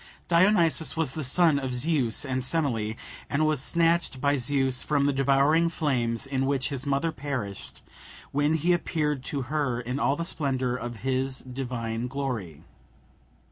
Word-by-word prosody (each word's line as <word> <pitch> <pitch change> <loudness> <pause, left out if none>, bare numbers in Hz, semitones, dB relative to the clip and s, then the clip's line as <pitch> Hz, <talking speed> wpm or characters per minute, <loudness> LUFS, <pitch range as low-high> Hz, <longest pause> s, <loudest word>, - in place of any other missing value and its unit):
Dionysus 170 -2 +3
was 155 -5 +2
the 155 - -3
son 150 +2 +4
of 130 -2 -3
Zeus 135 -2 +1
and 130 -1 -2
Semele, 125 -8 0 0.3
and 150 +2 +1
was 155 -3 +1
snatched 170 -3 +1
by 140 +2 +2
Zeus 135 -1 +1
from 145 -2 +1
the 145 - +2
devouring 140 +5 +3
flames 130 -6 -1
in 135 -1 -1
which 140 0 0
his 140 -1 -4
mother 140 +4 +1
perished, 130 -9 -5 0.5
when 145 +2 +2
he 170 +3 +2
appeared 150 -5 -1
to 140 -2 -2
her 135 -2 -1
in 125 +3 -4
all 140 - +2
the 170 - -3
splendour 130 -7 -1
of 120 -1 -5
his 130 0 -1
divine 125 -3 -4
glory. 120 - -4
135 Hz, 155 wpm, -27 LUFS, 125-155 Hz, 0.5 s, son